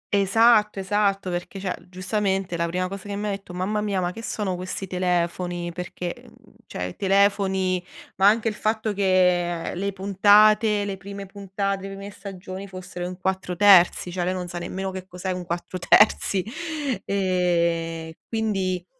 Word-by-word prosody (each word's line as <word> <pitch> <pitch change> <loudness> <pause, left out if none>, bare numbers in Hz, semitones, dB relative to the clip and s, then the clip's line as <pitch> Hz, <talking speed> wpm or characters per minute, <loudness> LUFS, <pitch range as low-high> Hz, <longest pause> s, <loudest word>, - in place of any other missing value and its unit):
Esatto 210 +1 +4
esatto, 195 -1 0
perché 175 +2 -5
cioè, 190 -2 -2
giustamente 190 -1 -1
la 170 0 0
prima 180 +2 -1
cosa 195 +1 -8
che 200 - -3
mi 205 +1 -3
ha - - -1
detto: 195 -2 -7
"Mamma 210 +4 -1
mia, 200 -3 -1
ma 175 -1 -1
che 225 +5 -9
sono 205 -5 -2
questi 185 +2 -5
telefoni?". 175 -1 -1
Perché, 180 0 -5
uhm, - - -21
cioè, - - -5
i 90 0 -5
telefoni 190 -2 +2 0.3
ma 195 +1 +5
anche 225 +2 +3
il 220 - 0
fatto 215 0 -1
che 180 -3 +2
le 200 +3 -2
puntate 205 +2 +4
le 195 -1 -4
prime 200 +1 -8
puntate, 195 0 -3
le 195 - -7
prime 200 +1 -8
stagioni 195 -1 -8
fossero 185 -1 -7
in 180 0 -7
4:3, 190 -1 +4
cioè 180 0 -2
lei 185 +1 0
non 180 -1 -4
sa 175 0 -5
nemmeno 190 +2 -4
che 185 0 -7
cos'è 185 +1 -4
un 180 -1 -4
4:3 185 +2 +3 0.6
e 170 -4 0
quindi 195 -5 -1
190 Hz, 160 wpm, -24 LUFS, 180-200 Hz, 0.6 s, ma